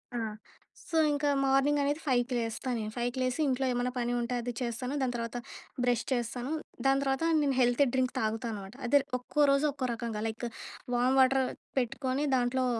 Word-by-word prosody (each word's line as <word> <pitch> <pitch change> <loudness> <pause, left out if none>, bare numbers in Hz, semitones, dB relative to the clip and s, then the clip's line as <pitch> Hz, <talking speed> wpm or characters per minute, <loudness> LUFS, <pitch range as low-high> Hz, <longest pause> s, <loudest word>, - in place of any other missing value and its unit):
ఆ! - - 0 0.7
సో, 330 - 0
ఇంకా 290 0 +1
మార్నింగ్ 275 +2 +3
అనేది 290 +3 0
5 250 -1 +2
లేస్తా 230 +3 -3
నేను. 215 -1 -4
ఫైవ్‌కి 245 +2 -1
లేసి 255 +3 0
ఇంట్లో 265 0 +1
ఏమన్నా 245 0 0
పని 240 0 0
ఉంటే, 235 +1 -2
అది 245 +1 -3
చేస్తాను. 250 +2 -3
దాని 255 -2 0
తర్వాత 230 0 -3 0.5
బ్రష్ 245 -2 +2
చేస్తాను. 245 +2 -2 0.3
దాని 270 0 +4
తర్వాత 270 +2 0 0.2
నేను 280 -2 +1
హెల్తీ 245 +3 +4
డ్రింక్ 260 -1 +1
తాగుతా 220 +2 -1
అనమాట. 200 -2 -7
అదే 285 +4 +5 0.2
ఒక్కో 250 +4 -5
రోజు 275 +2 +3
ఒక్కో 265 -2 -3
రకంగా, 230 -2 -4
లైక్ 225 +2 -4 0.5
వామ్ 250 +2 +3
వాటర్ 265 +1 +4 0.4
పెట్టుకొని 260 +3 -1
దాంట్లో 255 +1 +1
250 Hz, 175 wpm, -30 LUFS, 240-270 Hz, 0.7 s, అదే